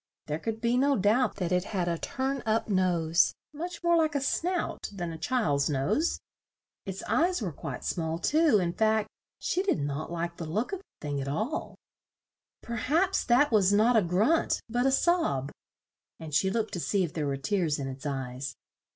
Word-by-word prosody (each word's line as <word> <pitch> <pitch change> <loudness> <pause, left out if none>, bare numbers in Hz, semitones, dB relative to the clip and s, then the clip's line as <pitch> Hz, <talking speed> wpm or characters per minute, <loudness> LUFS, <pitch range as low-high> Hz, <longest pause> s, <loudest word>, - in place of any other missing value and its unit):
There 150 +1 -3
could 225 +2 -4
be 240 +1 +2
no 275 +1 +3
doubt 220 +6 +2
that 180 -3 -2
it 180 0 +2
had 175 -1 0
a 170 - +1
turn 270 +1 -2
up 220 0 0
nose, 180 -3 +2 0.2
much 340 +3 -6
more 340 0 +4
like 315 -3 +2
a - - +3
snout 340 +6 -1
than 175 -4 -4
a 165 - -6
child's 160 - +1
nose. 145 - 0 0.7
Its 190 0 -5
eyes 355 +3 +1
were 195 -6 -3
quite 140 -3 -6
small 165 -2 -2
too; 305 - +3
in 175 -3 0
fact 220 0 +2 0.3
she 365 - -1
did 395 - +1
not 145 +3 -3
like 170 0 -3
the 165 - -5
look 215 - -2
of 385 - -2
the 260 - -12
thing 145 -1 -2
at 135 - -5
all. 215 - -3 0.9
"Per 235 0 -4
haps 330 - +1
that 250 +4 +4
was 200 -3 +4
not 220 +4 +4
a 220 - +6
grunt, 205 - +2
but 245 +3 +1
a - - +3
sob," 270 - +1 0.7
and 160 -2 -8
she 190 +6 +3
looked 220 +2 -1
to 175 - -2
see 195 +3 +1
if 170 - -3
there 150 -3 -2
were 140 -1 -1
tears 155 +1 0
in 135 - -4
its 135 0 -7
eyes. 130 -1 -4
205 Hz, 195 wpm, -28 LUFS, 160-265 Hz, 0.9 s, a